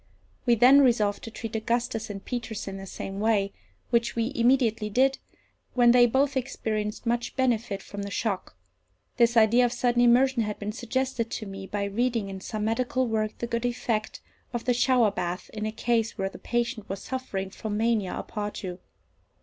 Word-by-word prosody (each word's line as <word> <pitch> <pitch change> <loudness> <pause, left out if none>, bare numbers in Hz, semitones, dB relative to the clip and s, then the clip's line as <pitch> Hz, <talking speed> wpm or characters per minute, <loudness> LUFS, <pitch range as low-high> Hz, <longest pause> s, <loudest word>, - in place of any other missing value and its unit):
We 240 - +6
then 255 +5 +7
resolved 220 -6 +2
to - - -6
treat 225 0 -7
Augustus 225 0 -1
and 195 -1 -7
Peters 235 -5 -4
in 195 0 -5
the 195 0 -8
same 195 +1 -6
way, 205 -2 +1 0.4
which 235 -1 +2
we 230 +2 0
immediately 230 -3 +2
did, 265 +5 +2 0.6
when 240 -1 +6
they 245 0 +6
both 270 +4 +1
experienced 220 -5 -2
much 240 +1 -1
benefit 235 -6 0
from 205 - -7
the 200 - -4
shock. 200 -2 -3 0.6
This 235 -1 +4
idea 230 +3 +6
of 245 - +2
sudden 240 -1 +1
immersion 245 +1 +4
had 210 -1 -2
been 205 0 -4
suggested 245 0 -2
to 215 - -4
me 195 -1 -7
by 205 0 -2
reading 225 +1 0
in 190 -1 -7
some 215 +1 -3
medical 250 +3 0
work 220 -2 -1
the - - -3
good 235 0 -2
effect 235 -3 -2 0.3
of 240 -1 -3
the 250 - +3
shower 245 -3 +3
bath 180 -1 -4
in 215 0 -3
a - - -2
case 230 0 0
where 195 -1 -1
the - - -12
patient 235 -2 -2
was 195 0 -5
suffering 195 -8 -4
from 210 +1 -4
mania 220 -4 +1
a - - -4
potu. 205 -4 -5
230 Hz, 185 wpm, -27 LUFS, 210-245 Hz, 0.6 s, then